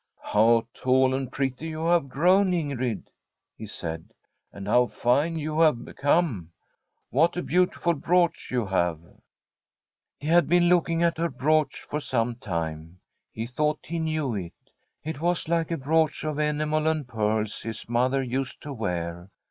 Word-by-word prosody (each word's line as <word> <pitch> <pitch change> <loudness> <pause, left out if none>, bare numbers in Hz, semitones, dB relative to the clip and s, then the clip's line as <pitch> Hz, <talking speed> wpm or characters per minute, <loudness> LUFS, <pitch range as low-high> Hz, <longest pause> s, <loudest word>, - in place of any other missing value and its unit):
* - - -57 0.2
How 115 +2 +4
tall 130 0 +2
and 130 -1 -3
pretty 135 +3 -2
you 160 0 -4
have 170 -5 +2
grown, 180 +7 +3
Ingrid! 135 - -2 0.3
' - - -54
he 110 - -7
said. 80 -5 -6 0.2
* - - -52
And 100 0 -8
how 125 +3 +4
fine 145 +10 +1
you 155 0 -2
have 155 -7 +3
become! 140 - 0 0.6
What 165 +7 +3
a 180 - -1
beautiful 180 -1 +1
brooch 170 +3 +1
you 125 -3 0
have! 85 -4 0 0.6
' - - -67
He 145 - -9
had 170 0 +4
been 175 0 +4
looking 170 -1 +2
at 170 -1 +1
her 170 0 +1
brooch 155 +3 +1
for 150 - -3
some 120 -4 -1
time. 85 -4 -5 0.3
He 110 - -4
thought 150 +5 -1
he 170 +1 -3
knew 155 -5 -1
it; 90 -5 -5 0.5
it 155 -2 -5
was 175 -1 0
like 165 -1 0
a 165 - -1
brooch 155 +3 +1
of 155 -1 -2
enamel 150 +1 0
and 155 -4 0
pearls 110 -2 -1
his 115 0 -6
mother 130 +3 +1
used 130 +1 -3
to 145 - -6
wear. 85 -5 -4
140 Hz, 170 wpm, -26 LUFS, 115-160 Hz, 0.6 s, How